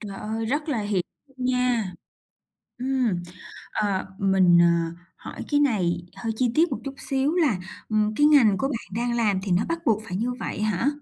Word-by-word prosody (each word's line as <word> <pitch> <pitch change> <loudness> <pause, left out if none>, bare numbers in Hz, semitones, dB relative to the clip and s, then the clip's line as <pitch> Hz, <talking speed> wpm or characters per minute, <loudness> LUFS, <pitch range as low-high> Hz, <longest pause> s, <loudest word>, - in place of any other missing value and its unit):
Trời 200 -3 -7
ơi! 220 +1 -3
Rất 295 +6 -1
là 265 -7 0
hiểu 205 -3 0 0.2
luôn 265 -2 -8
nha. 250 -6 +1 0.9
Ừm, 250 -8 0 0.5
ờ, 200 -3 -1
mình, 190 -3 +5
ờ, 170 -1 +2 0.2
hỏi - - -8
cái 290 - +4
này 180 -11 +1
hơi 225 -1 -3
chi 245 0 +1
tiết 330 +1 +3
một 260 - -1
chút 275 - -5
xíu 275 +4 -1
là, 300 - +2 0.3
ừm, 215 -1 +1
cái 295 - +4
ngành 260 -10 +6
của 270 - 0
bạn 255 -5 -5
đang 235 +1 0
làm 210 -5 +2
thì 195 - -3
nó 180 +4 +2
bắt 335 0 -1
buộc 220 -1 +2
phải 180 - -3
như 240 +4 -1
vậy - - -4
hả? 215 +3 0
225 Hz, 195 wpm, -25 LUFS, 195-265 Hz, 0.9 s, ngành